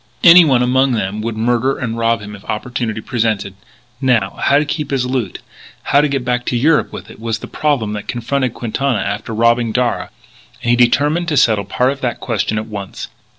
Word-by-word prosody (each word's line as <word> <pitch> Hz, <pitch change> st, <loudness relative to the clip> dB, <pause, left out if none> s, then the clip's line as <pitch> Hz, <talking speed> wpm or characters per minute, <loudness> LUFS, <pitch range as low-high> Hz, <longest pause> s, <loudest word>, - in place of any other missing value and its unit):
Anyone 165 Hz, -8 st, +7 dB
among 130 Hz, +1 st, +2 dB
them 105 Hz, -1 st, -2 dB
would 115 Hz, 0 st, -4 dB
murder 120 Hz, +4 st, +1 dB
and 115 Hz, -3 st, -3 dB
rob 115 Hz, 0 st, +1 dB
him 105 Hz, 0 st, -8 dB
if 100 Hz, -, -14 dB
opportunity 110 Hz, 0 st, -3 dB
presented. 110 Hz, -5 st, -1 dB, 0.5 s
Now, 115 Hz, -7 st, +2 dB
how 140 Hz, -, +4 dB
to 150 Hz, -, +2 dB
keep 150 Hz, 0 st, -3 dB
his 135 Hz, -3 st, 0 dB
loot; 125 Hz, -7 st, -3 dB, 0.4 s
how 140 Hz, -, +3 dB
to 150 Hz, -, +2 dB
get 135 Hz, -3 st, -2 dB
back 125 Hz, -1 st, 0 dB
to 120 Hz, -, 0 dB
Europe 150 Hz, +5 st, +2 dB
with -, -, -9 dB
it, -, -, -14 dB
was 115 Hz, 0 st, -2 dB
the -, -, -9 dB
problem 135 Hz, -9 st, -1 dB
that 105 Hz, -1 st, -6 dB
confronted 125 Hz, +1 st, -2 dB
Quintana 125 Hz, +2 st, -1 dB
after 100 Hz, +3 st, -3 dB
robbing 115 Hz, +1 st, +2 dB
Darragh. 125 Hz, +1 st, -1 dB, 0.5 s
And 120 Hz, -, +1 dB
he -, -, +5 dB
determined 145 Hz, +8 st, +2 dB
to 150 Hz, -4 st, 0 dB
settle 110 Hz, -6 st, +3 dB
part 125 Hz, +6 st, +1 dB
of 140 Hz, 0 st, -7 dB
that 120 Hz, -2 st, -2 dB
question 110 Hz, -2 st, -1 dB
at 110 Hz, -, -2 dB
once. 100 Hz, -3 st, -7 dB
120 Hz, 200 wpm, -17 LUFS, 110-135 Hz, 0.5 s, Anyone